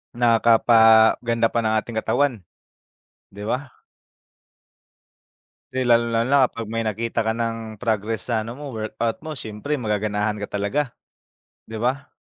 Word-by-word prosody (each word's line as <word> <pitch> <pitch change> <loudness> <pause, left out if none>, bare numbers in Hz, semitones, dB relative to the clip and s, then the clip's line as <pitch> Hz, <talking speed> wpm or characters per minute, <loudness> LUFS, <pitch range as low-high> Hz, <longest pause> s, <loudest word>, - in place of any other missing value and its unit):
Nakapaganda 115 0 +4
pa 115 - 0
ng 110 -1 0
ating 110 +1 -1
katawan, 135 -2 0 0.9
di 100 +1 -9
ba? 130 +4 -2 2.0
'Di 130 - -1
lalong-lalo 115 +1 +2
na 140 -1 +5
kapag 115 -2 -6
may 115 0 -2
nakita 115 +1 -2
ka 110 - +1
ng 115 -2 -4
progress 110 -1 -1
sa 110 -2 0
ano 115 - -6
mo, 145 +3 -9
workout 115 0 -3
mo, 155 - -4
siyempre 110 +3 -5
magaganahan 105 0 -1
ka 105 - -4
talaga, 115 +7 -1 0.7
di 110 0 -7
ba? 135 +3 -1
115 Hz, 135 wpm, -22 LUFS, 110-120 Hz, 2.0 s, na